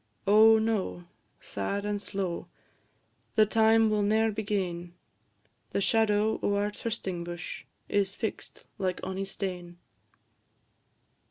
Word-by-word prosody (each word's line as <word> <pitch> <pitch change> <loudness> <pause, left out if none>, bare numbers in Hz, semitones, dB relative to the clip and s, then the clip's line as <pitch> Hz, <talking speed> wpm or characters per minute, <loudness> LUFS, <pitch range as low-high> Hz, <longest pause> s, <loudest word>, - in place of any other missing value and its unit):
Oh, 220 +2 +7
no! 220 -5 -1 0.4
sad 200 - -3
and 205 -1 -2
slow, 195 -4 -3 0.9
The 215 - +6
time 220 +1 +4
will 210 -1 +2
ne'er 220 +2 +2
be 215 +1 -3
gane; 180 -4 -3 0.8
The - - +1
shadow 215 +1 +2
o' 205 - +1
our 205 +1 0
trysting 195 -6 -4
bush 175 0 -6 0.2
Is 200 -1 0
fix'd 220 - -5 0.2
like 185 -2 -1
ony 190 +1 -3
stane. 180 -3 -5
205 Hz, 115 wpm, -29 LUFS, 185-220 Hz, 0.9 s, Oh